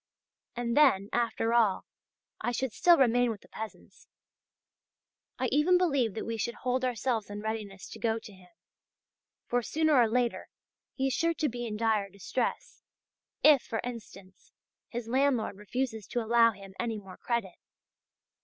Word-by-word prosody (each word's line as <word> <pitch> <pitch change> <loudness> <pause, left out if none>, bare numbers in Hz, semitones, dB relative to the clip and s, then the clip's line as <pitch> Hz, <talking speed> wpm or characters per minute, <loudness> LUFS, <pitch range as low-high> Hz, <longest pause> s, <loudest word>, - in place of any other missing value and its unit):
And, 235 0 -2
then, 235 -10 +4
after 230 -1 0
all, 220 -5 +3 0.6
I 240 - 0
should 255 -1 -2
still 345 -1 +5
remain 245 -2 +3
with 215 -3 -5
the - - -19
peasants. 220 -1 -10 1.3
I - - -1
even 330 +5 +4
believe 280 - +1
that - - -4
we 230 0 -3
should 235 +2 -2
hold 255 +1 -1
ourselves 235 -3 -1
in 205 0 -6
readiness 215 -3 -5
to - - -9
go 225 -1 +1
to 220 -2 -10
him; 185 -1 -18 1.0
for 245 0 0
sooner 315 +5 +1
or 240 -5 +5
later 240 0 0 0.5
he 265 - -1
is 270 - +1
sure 335 0 +1
to 310 - 0
be 240 -2 -4
in 210 -1 -4
dire 215 -3 +1
distress, 200 +6 -3 0.6
if, 295 -4 +7
for 225 - -4
instance, 200 -6 -10 0.4
his 235 -1 -5
landlord 255 -4 +1
refuses 220 +1 -3
to 245 - -2
allow 230 +1 +5
him 195 -3 -10
any 230 -2 -2
more 195 -3 -11
credit. 230 -7 -3
235 Hz, 160 wpm, -29 LUFS, 215-255 Hz, 1.3 s, if